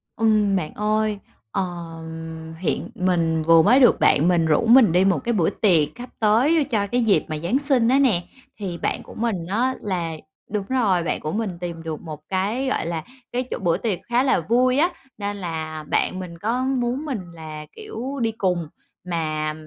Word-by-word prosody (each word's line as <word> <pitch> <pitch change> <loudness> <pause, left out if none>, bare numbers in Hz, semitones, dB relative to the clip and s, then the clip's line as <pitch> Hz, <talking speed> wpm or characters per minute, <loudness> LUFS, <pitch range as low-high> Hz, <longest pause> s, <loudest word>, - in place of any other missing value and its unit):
Ừm, 215 -3 +3
bạn 165 -5 -2
ơi, 215 0 0 0.3
ờ, 195 - 0 1.0
hiện 185 - -2
mình 170 -3 +1
vừa 165 0 +6
mới 240 +9 +5
được 250 - +5
bạn 150 +4 +4
mình 175 -2 +3
rủ 160 +7 +2
mình 230 -3 +7
đi 180 +3 +4
1 195 -3 +3
cái 235 - 0
bữa 175 -7 +2
tiệc 170 -8 +3
sắp 245 0 -8
tới 250 +9 +4
cho 220 -7 -1
cái 245 +4 0
dịp 220 -4 +3
mà 155 -2 -3
Giáng 175 - 0
sinh 270 -5 +2
á 265 +2 +4
nè, 235 -11 +3 0.4
thì 185 -4 -4
bạn - - -2
của - - -12
mình 215 -7 -2
á 245 +7 0
là 175 -5 -2 0.4
đúng 205 -1 -2
rồi, 210 -9 +2
bạn - - -1
của 155 - -4
mình 220 +3 -1
tìm 170 -2 -5
được 160 -2 -5
1 155 -3 -8
cái, 205 +8 -1
gọi 260 - 0
là, 165 -1 -3 0.3
cái 250 +1 -1
chỗ - - -1
bữa 175 -3 +1
tiệc 205 -3 -2
khá 240 +2 +3
là 270 - +3
vui 250 +9 +2
á, 330 +5 +4 0.3
nên 205 -1 -3
là 160 -4 -5
bạn 185 - +1
mình 175 -2 -7
có 230 +7 -1
muốn 260 +1 -1
mình 260 -9 -3
là, 155 -2 -8
kiểu, 265 +5 -6
đi 225 -1 +1
cùng, 180 -6 -1 0.4
mà 155 -3 -2
200 Hz, 200 wpm, -23 LUFS, 170-240 Hz, 1.0 s, mình